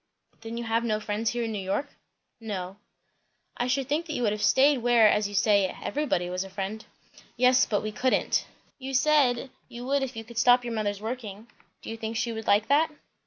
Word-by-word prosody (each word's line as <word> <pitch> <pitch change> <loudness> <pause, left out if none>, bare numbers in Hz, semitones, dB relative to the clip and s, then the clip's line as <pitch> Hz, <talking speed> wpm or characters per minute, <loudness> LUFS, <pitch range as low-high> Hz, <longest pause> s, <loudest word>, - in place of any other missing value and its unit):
"Then 225 +1 -6
you 235 - -3
have 230 0 0
no 215 -2 0
friends 215 +1 -2
here 240 0 -2
in 225 - -3
New 210 - -3
York?" 195 +10 -2 0.5
"No." 195 -4 -5 0.8
"I 245 - -1
should 260 +1 0
think 310 +4 -1
you 265 -5 -2
would 210 - +2
have 210 0 -4
stayed 275 +3 +4
where, 235 -2 +5
as 210 0 +2
you 205 - -7
say, 205 -1 +3
everybody 275 -12 -1
was 180 +1 -2
a 195 - -10
friend." 200 +3 -5 0.5
"Yes, 250 +1 +4
but 205 - 0
we 215 - -3
couldn't." 255 +4 0 0.3
"You 265 0 -5
said, 270 -3 +3 0.2
you 240 +1 -8
would 280 +1 +1
if 265 -2 -4
you 225 - -6
could 230 +1 -6
stop 245 +1 +5
your 235 - -3
mother's 205 -2 -2
working. 225 -1 -6 0.3
Do - - -6
you 225 - -6
think 225 0 -4
she 235 +1 -1
would 220 -1 -6
like 205 +2 +3
that?" 300 +3 +3
230 Hz, 215 wpm, -27 LUFS, 210-255 Hz, 0.8 s, where